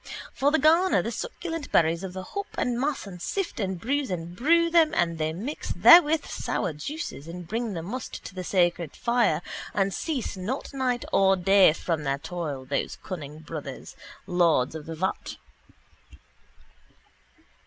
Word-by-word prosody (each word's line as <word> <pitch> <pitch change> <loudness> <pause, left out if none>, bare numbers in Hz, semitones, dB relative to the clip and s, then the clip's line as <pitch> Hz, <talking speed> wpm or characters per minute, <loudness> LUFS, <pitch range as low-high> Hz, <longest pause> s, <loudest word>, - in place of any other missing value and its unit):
For 275 - +2
they 320 - +4
garner 330 +6 +4
the - - -3
succulent 330 -10 -5
berries 165 +2 +3
of 185 -1 -5
the 185 0 -6
hop 400 - -5
and 240 -1 0
mass 280 -1 -1
and 180 -3 -10
sift 385 - -3
and 190 -3 -2
bruise 275 +6 -1
and 175 -1 -5
brew 335 - +3
them 330 -2 +4
and 170 -1 0
they 155 0 0
mix 220 - -5
therewith 320 -2 +7
sour 180 -5 -2
juices 285 - -6
and 175 0 -8
bring 225 +2 -2
the 165 -2 -4
must 230 +7 -6
to - - -8
the 185 -1 -5
sacred 175 -3 +1
fire 235 -9 +1 0.3
and 195 -1 +1
cease 280 -10 -3
not 215 +11 -4
night 255 -2 -1
or 195 0 +5
day 190 0 +5
from 165 -1 -2
their 140 -1 0
toil, 145 -4 -5
those 140 +2 -2
cunning 155 -4 -7
brothers, 150 -4 -8 0.3
lords 170 -8 +2
of 160 -1 -8
the 165 - -5
vat. 185 +4 -3
190 Hz, 165 wpm, -26 LUFS, 165-275 Hz, 0.3 s, therewith